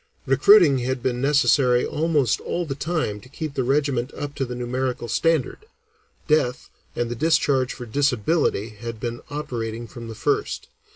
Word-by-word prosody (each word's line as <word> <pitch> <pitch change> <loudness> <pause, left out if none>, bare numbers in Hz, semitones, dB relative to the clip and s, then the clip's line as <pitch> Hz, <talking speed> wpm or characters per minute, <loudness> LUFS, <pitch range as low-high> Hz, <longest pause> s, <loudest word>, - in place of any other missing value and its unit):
Recruiting 140 +2 +6
had 125 0 -2
been 125 -1 -1
necessary 135 -3 +3
almost 150 -6 +1
all 175 - -3
the 145 - -3
time 140 -7 -2
to 125 - -16
keep 155 +1 -5
the 130 - -1
regiment 135 -1 0
up 145 -1 -5
to 135 - -2
the 125 0 -6
numerical 125 0 -2
standard; 165 - 0 0.6
death 140 -5 +1 0.2
and 120 -1 -2
the - - -2
discharge 140 -3 +2
for 125 - -8
disability 125 -2 +1
had 115 +1 -8
been 120 +1 -4
operating 120 -6 -4
from 115 0 -9
the 115 - -7
first. - - -1
130 Hz, 160 wpm, -23 LUFS, 120-145 Hz, 0.6 s, Recruiting